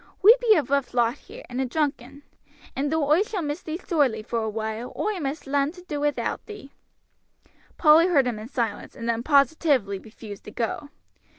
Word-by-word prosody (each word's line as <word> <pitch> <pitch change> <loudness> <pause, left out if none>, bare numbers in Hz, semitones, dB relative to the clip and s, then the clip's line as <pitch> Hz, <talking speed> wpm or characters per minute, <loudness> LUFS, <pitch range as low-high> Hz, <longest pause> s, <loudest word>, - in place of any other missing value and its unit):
We 440 +5 +10
be 450 -3 +5
a 310 - +2
rough 275 -1 -1
lot 235 -1 +3
here, 475 +5 -12
and 250 +1 -3
a - - 0
drunken; 280 -1 -3 0.5
and 285 +2 -1
though 315 -3 +1
oi 305 +6 +4
shall 415 -4 -2
miss 295 +3 -3
thee 315 0 -4
sorely 285 - 0
for 230 +1 -2
awhile, 220 +2 -4
oi 420 -3 -1
must 285 0 -4
larn 280 +1 +1
to 360 -1 -13
do 300 -5 -4
wi'out 295 -1 -1
thee." 415 -11 -10 1.1
Polly 320 +2 +6
heard 290 -8 +3
him 240 -4 -2
in 215 - -8
silence, 235 -6 -3
and 230 - -6
then 230 0 0
positively 280 - +2
refused 215 -1 -11
to - - -9
go. 245 +6 -3
280 Hz, 190 wpm, -25 LUFS, 235-320 Hz, 1.1 s, We